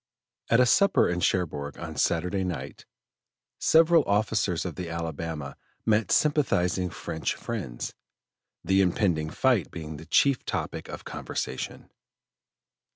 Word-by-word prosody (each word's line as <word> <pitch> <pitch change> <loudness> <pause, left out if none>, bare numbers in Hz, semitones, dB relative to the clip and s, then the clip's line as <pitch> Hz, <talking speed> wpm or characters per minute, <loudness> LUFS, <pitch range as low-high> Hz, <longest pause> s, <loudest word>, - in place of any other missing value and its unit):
At 115 - +5
a 125 - +6
supper 200 +10 +4
in 90 0 -1
Cherbourg 75 -6 -1
on - - -7
Saturday 90 +3 0
night, 90 -4 -5 0.7
several 165 0 +5
officers 100 -4 +1
of 90 - -3
the 90 0 -6
Alabama 80 -3 -4 0.3
met 110 -1 +2
sympathizing 95 - +2
French 80 -1 -3
friends 90 - -5 0.7
the 95 0 +3
impending 90 -4 +1
fight 125 -1 +2
being 80 -2 -7
the 80 - -11
chief 140 -3 +3
topic - - -4
of - - -8
conversation. 65 - -5
90 Hz, 120 wpm, -27 LUFS, 80-110 Hz, 0.7 s, a